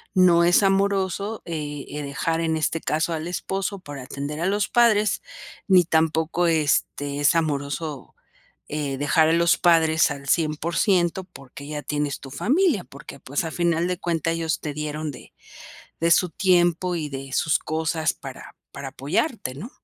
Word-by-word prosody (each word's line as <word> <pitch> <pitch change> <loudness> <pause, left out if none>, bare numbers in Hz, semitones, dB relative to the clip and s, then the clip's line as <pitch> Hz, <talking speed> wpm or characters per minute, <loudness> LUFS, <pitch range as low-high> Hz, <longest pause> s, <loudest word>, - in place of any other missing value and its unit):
no 175 -2 +5
es 175 +4 +5
amoroso, 195 +2 0
eh 150 -4 -5
eh, 150 +1 -5
dejar 165 +4 -2
en 160 -1 0
este 155 +1 -1
caso 165 +2 0
al 160 +1 -4
esposo 195 +3 -3
para 145 -6 -8
atender 145 +3 -5
a 180 - +1
los 205 +1 +1
padres, 215 -4 +3 0.5
ni 185 -2 +6
tampoco 160 +2 +1
este, 145 -2 0
es 145 +3 +4
amoroso, 145 -2 -2 0.5
eh, 145 -3 -3
dejar 155 +3 +3
a - - +3
los 170 0 +3
padres 160 -2 +4
al 140 0 -7
100% 170 +3 +1
porque 140 -4 -12
ya 150 -1 -5
tienes 145 -1 -2
tu 135 - -11
familia, 270 - +1
porque, 140 0 -12
pues, 140 +6 -2
a 160 - -4
final 170 0 +1
de 180 0 -2
cuenta, 165 -1 -1
ellos 165 -1 -1
te 150 -2 -4
dieron 150 0 -4
de 125 - -14 0.7
de 170 +1 +2
su 180 +2 +4
tiempo 175 -1 +2
y 155 -2 -3
de 135 -1 -7
sus 160 - +2
cosas 160 0 -1
para 135 -2 -10 0.2
para 140 -1 -6
apoyarte, 140 - -2
¿no? 215 - -8
160 Hz, 165 wpm, -24 LUFS, 145-175 Hz, 0.7 s, ni